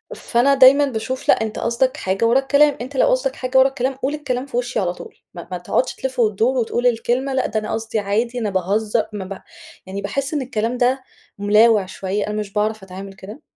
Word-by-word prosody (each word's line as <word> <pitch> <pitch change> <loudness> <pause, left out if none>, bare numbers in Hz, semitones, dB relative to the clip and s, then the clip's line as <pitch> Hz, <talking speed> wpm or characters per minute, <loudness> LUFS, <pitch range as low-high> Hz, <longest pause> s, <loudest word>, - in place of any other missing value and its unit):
فأنا 250 +4 +2
دايمًا 270 +2 +7
باشوف 255 0 -4
لأ - - +5
أنت 220 -1 -3
قصدك 255 +5 0
حاجة 190 0 -1
ورا 235 +3 +4
الكلام، 285 +2 +3
أنت 260 +3 -7
لو - - +4
قصدك 260 +1 +1
حاجة 255 0 -1
ورا 260 0 +7
الكلام 265 0 -2
قُل 270 +2 -2
الكلام 260 -3 -3
في 265 -4 -5
وشي 245 +1 -1
على 180 -2 -1
طول - - -12 0.2
ما 170 -2 -9
ما 180 - -2
تقعدش 180 +8 -1
تلِّف 260 -1 -5
و 220 -2 +4
تدور، 230 +6 0
وتقول 240 +1 0
الكلمة 245 +3 0
لأ 260 - +1
ده 215 - -1
أنا 215 - -5
قصدي 225 0 -2
عادي 225 +5 -1
أنا 220 -3 -1
باهزّر، 205 +4 0
ما 200 -2 -5
ب 190 0 -8 0.4
يعني 195 +2 -5
باحس 275 +9 -3
إن 290 - 0
الكلام 245 -1 -2
ده 255 +1 +1 0.3
ملاوع 210 +1 +4
شوية، 195 +2 -3
أنا 210 - -3
مش 200 -2 -6
باعرف 215 -1 -1
أتعامل 195 +1 -9
كده، 205 +8 -11
235 Hz, 220 wpm, -20 LUFS, 205-260 Hz, 0.4 s, دايمًا